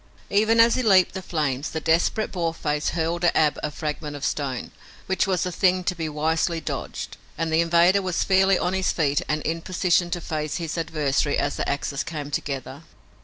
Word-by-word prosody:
Even 220 Hz, +3 st, +3 dB
as 230 Hz, +1 st, +7 dB
he 255 Hz, -, +1 dB
leaped 190 Hz, -6 st, +4 dB
the 190 Hz, -, -4 dB
flames, 150 Hz, -5 st, -2 dB
the 160 Hz, -, -3 dB
desperate 165 Hz, +7 st, +1 dB
Boarface 165 Hz, -4 st, -1 dB
hurled 170 Hz, +2 st, -1 dB
at 175 Hz, -, +3 dB
Ab 150 Hz, -2 st, +2 dB
a 150 Hz, -, -2 dB
fragment 150 Hz, 0 st, -5 dB
of 145 Hz, -, -4 dB
stone, 135 Hz, -5 st, -3 dB, 0.3 s
which 190 Hz, +1 st, 0 dB
was 185 Hz, -2 st, 0 dB
a 180 Hz, -, -2 dB
thing 185 Hz, +1 st, +2 dB
to 180 Hz, -, 0 dB
be 165 Hz, -3 st, -4 dB
wisely 160 Hz, +2 st, 0 dB
dodged, -, -, -5 dB, 0.2 s
and 165 Hz, -1 st, -1 dB
the 160 Hz, -, +4 dB
invader 170 Hz, +3 st, +4 dB
was 185 Hz, -2 st, -1 dB
fairly 190 Hz, 0 st, +4 dB
on 180 Hz, +1 st, -1 dB
his 190 Hz, -1 st, +1 dB
feet 145 Hz, -3 st, +1 dB
and 150 Hz, 0 st, -1 dB
in 165 Hz, +1 st, -2 dB
position 180 Hz, 0 st, +1 dB
to 175 Hz, 0 st, -2 dB
face 155 Hz, -2 st, -3 dB
his 165 Hz, -3 st, -3 dB
adversary 150 Hz, -4 st, 0 dB
as 145 Hz, -, -1 dB
the -, -, -2 dB
axes 140 Hz, 0 st, -2 dB
came 150 Hz, -3 st, -6 dB
together. 135 Hz, 0 st, -4 dB
165 Hz, 200 wpm, -24 LUFS, 150-180 Hz, 0.3 s, as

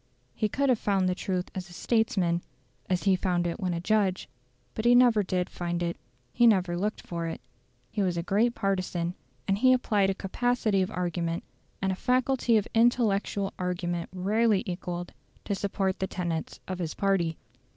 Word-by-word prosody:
He 215 Hz, -, 0 dB
could 275 Hz, +5 st, +1 dB
have 245 Hz, -4 st, +3 dB
found 195 Hz, -2 st, +1 dB
the 185 Hz, -, +2 dB
truth 180 Hz, 0 st, -3 dB
as 185 Hz, -1 st, -6 dB
a -, -, -12 dB
statesman 195 Hz, -5 st, +1 dB
just -, -, -24 dB, 0.5 s
as 180 Hz, -1 st, 0 dB
he 195 Hz, -2 st, +4 dB
found 180 Hz, -1 st, 0 dB
it 170 Hz, +3 st, -2 dB
when 180 Hz, -4 st, -1 dB
a -, -, -2 dB
judge; 195 Hz, 0 st, +1 dB, 0.5 s
but 220 Hz, -, -3 dB
he 240 Hz, +1 st, +6 dB
never 245 Hz, -3 st, +6 dB
did 180 Hz, -1 st, -1 dB
find 175 Hz, -1 st, -3 dB
it. 170 Hz, 0 st, -1 dB, 0.4 s
He 240 Hz, -, +5 dB
never 185 Hz, -5 st, +3 dB
looked 205 Hz, +5 st, -2 dB
for 170 Hz, -1 st, -3 dB
it. 165 Hz, -, -5 dB, 0.5 s
He 210 Hz, -, -1 dB
was 180 Hz, -3 st, 0 dB
a 170 Hz, -, -1 dB
great 220 Hz, +6 st, +2 dB
partisan, 185 Hz, -4 st, -1 dB, 0.3 s
and 195 Hz, 0 st, +1 dB
he 255 Hz, +2 st, +6 dB
applied 210 Hz, -6 st, +2 dB
a 195 Hz, -, 0 dB
capacity 215 Hz, 0 st, 0 dB
of 185 Hz, -, 0 dB
argument, 175 Hz, -3 st, -2 dB, 0.4 s
and 190 Hz, -, +2 dB
a -, -, -1 dB
faculty 250 Hz, +1 st, +2 dB
of 210 Hz, -, 0 dB
intellectual 220 Hz, -4 st, +2 dB
argument 175 Hz, -2 st, -2 dB
rarely 205 Hz, +3 st, +2 dB
equalled, 175 Hz, -2 st, -5 dB, 0.3 s
to -, -, -1 dB
support 195 Hz, -1 st, -1 dB
the 190 Hz, -, -1 dB
tenets 170 Hz, -4 st, -3 dB
of 185 Hz, -1 st, -4 dB
his 165 Hz, -3 st, -3 dB
party. 185 Hz, -5 st, +1 dB
190 Hz, 185 wpm, -28 LUFS, 175-215 Hz, 0.5 s, he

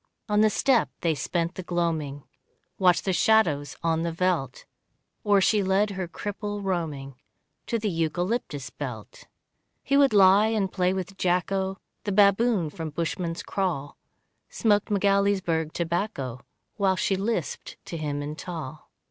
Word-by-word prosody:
On 210 Hz, -1 st, +3 dB
the 215 Hz, -, +5 dB
stoep 245 Hz, +3 st, +2 dB
they 165 Hz, -2 st, +2 dB
spent 170 Hz, +4 st, -2 dB
the 185 Hz, -, -6 dB
gloaming, 160 Hz, -5 st, -2 dB, 0.6 s
Watched 180 Hz, -2 st, +4 dB
the 190 Hz, -, +1 dB
shadows 170 Hz, -10 st, +2 dB
on 165 Hz, -1 st, +1 dB
the 170 Hz, 0 st, -1 dB
veldt, 165 Hz, -6 st, -1 dB, 0.6 s
Or 205 Hz, -1 st, +4 dB
she 210 Hz, +2 st, +3 dB
led 195 Hz, +2 st, +2 dB
her 190 Hz, -2 st, -4 dB
cripple 205 Hz, +3 st, -5 dB
roaming 145 Hz, -8 st, -3 dB, 0.5 s
To 230 Hz, -, 0 dB
the 220 Hz, -1 st, -2 dB
eucalyptus 165 Hz, -, -2 dB
belt. -, -, -8 dB, 0.6 s
He 275 Hz, -, +1 dB
would 280 Hz, -1 st, +5 dB
lie 200 Hz, +1 st, +6 dB
and 210 Hz, -4 st, 0 dB
play 180 Hz, -1 st, +1 dB
with 190 Hz, +1 st, -4 dB
Jacko, 190 Hz, +2 st, 0 dB, 0.3 s
The 205 Hz, -, -2 dB
baboon 200 Hz, -3 st, +3 dB
from 160 Hz, +1 st, -5 dB
Bushman's 165 Hz, +2 st, -3 dB
Kraal, 170 Hz, -8 st, -2 dB, 0.5 s
Smoked 210 Hz, -2 st, +1 dB
Magaliesberg 195 Hz, -5 st, +1 dB
tobacco 165 Hz, -, -3 dB, 0.4 s
While 195 Hz, -2 st, +2 dB
she 195 Hz, -, +1 dB
lisped 195 Hz, -5 st, -3 dB
to -, -, -6 dB
him 145 Hz, -2 st, -3 dB
in 150 Hz, +1 st, -5 dB
Taal. 160 Hz, -3 st, -7 dB
185 Hz, 140 wpm, -26 LUFS, 165-205 Hz, 0.6 s, lie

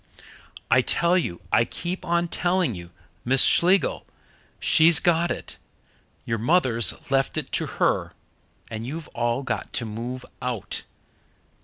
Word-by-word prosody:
"I 130 Hz, +2 st, +6 dB
tell 170 Hz, +7 st, +2 dB
you 90 Hz, -, -1 dB
I -, -, +4 dB
keep 175 Hz, +9 st, -5 dB
on 170 Hz, 0 st, +1 dB
telling 175 Hz, -5 st, 0 dB
you 85 Hz, -2 st, -9 dB, 0.3 s
Miss 130 Hz, +2 st, +4 dB
Schlegel 180 Hz, -2 st, +3 dB, 0.5 s
she's 160 Hz, 0 st, +5 dB
got 170 Hz, 0 st, +2 dB
it -, -, -5 dB, 0.7 s
your 115 Hz, -1 st, -2 dB
mother's 125 Hz, -3 st, +1 dB
left 135 Hz, -1 st, +1 dB
it -, -, -3 dB
to -, -, +1 dB
her -, -, +1 dB, 0.6 s
and 110 Hz, +1 st, -5 dB
you've 155 Hz, +3 st, -6 dB
all 120 Hz, +2 st, -1 dB
got -, -, -4 dB
to 120 Hz, -, -1 dB
move 120 Hz, +4 st, -6 dB, 0.2 s
out!" 125 Hz, -5 st, -4 dB
135 Hz, 135 wpm, -24 LUFS, 115-170 Hz, 0.7 s, I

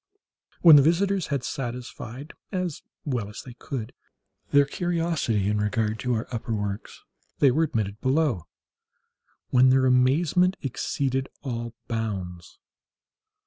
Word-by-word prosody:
When 160 Hz, -4 st, +10 dB
the -, -, +8 dB
visitors 185 Hz, +5 st, +2 dB
had 140 Hz, -4 st, -2 dB
satisfied, 125 Hz, +2 st, -6 dB, 0.2 s
as 180 Hz, -5 st, -3 dB, 0.2 s
well 120 Hz, -8 st, -2 dB
as 105 Hz, -, -9 dB
they 125 Hz, -, -10 dB
could, 125 Hz, -2 st, -6 dB, 0.6 s
their 145 Hz, 0 st, +5 dB
curiosity 165 Hz, -, -1 dB
in 105 Hz, 0 st, +1 dB
regard 110 Hz, +1 st, 0 dB
to 125 Hz, -1 st, 0 dB
our 110 Hz, -, -3 dB
upper 115 Hz, -1 st, -3 dB
works, 100 Hz, -1 st, -5 dB, 0.3 s
they 140 Hz, -, +5 dB
were 160 Hz, +5 st, +2 dB
admitted 110 Hz, -8 st, -3 dB
below, 130 Hz, -, +1 dB, 1.0 s
when 130 Hz, 0 st, +6 dB
their 130 Hz, 0 st, +4 dB
amazement 150 Hz, +9 st, +3 dB
exceeded 135 Hz, 0 st, -2 dB
all 120 Hz, -3 st, -4 dB
bounds. 95 Hz, -7 st, -4 dB
130 Hz, 125 wpm, -26 LUFS, 110-150 Hz, 1.0 s, When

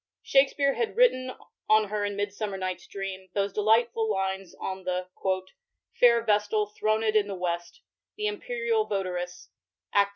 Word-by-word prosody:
Shakspere 275 Hz, 0 st, +3 dB
had 460 Hz, -, -2 dB
written 255 Hz, -, +4 dB, 0.4 s
on 215 Hz, -1 st, +5 dB
her 210 Hz, 0 st, -1 dB
in 205 Hz, 0 st, -3 dB
Midaummer 205 Hz, 0 st, -3 dB
Nighfs 185 Hz, -1 st, -4 dB
Dream, 190 Hz, -1 st, -6 dB
those 200 Hz, -1 st, 0 dB
delightful 225 Hz, +2 st, +2 dB
lines 190 Hz, -1 st, -2 dB
on 190 Hz, 0 st, -5 dB
the 180 Hz, 0 st, -2 dB, 0.9 s
"fair 235 Hz, -1 st, +6 dB
vestal 210 Hz, -1 st, +2 dB
thronM 215 Hz, +1 st, +1 dB
in 210 Hz, -2 st, +3 dB
the 200 Hz, -, -4 dB
west," 175 Hz, -, -3 dB, 0.3 s
•* -, -, -66 dB
the 425 Hz, -, -2 dB
imperial 460 Hz, +1 st, -1 dB
votaress," 180 Hz, -2 st, -3 dB, 0.5 s
II. 200 Hz, 0 st, +6 dB
210 Hz, 150 wpm, -27 LUFS, 190-235 Hz, 0.9 s, fair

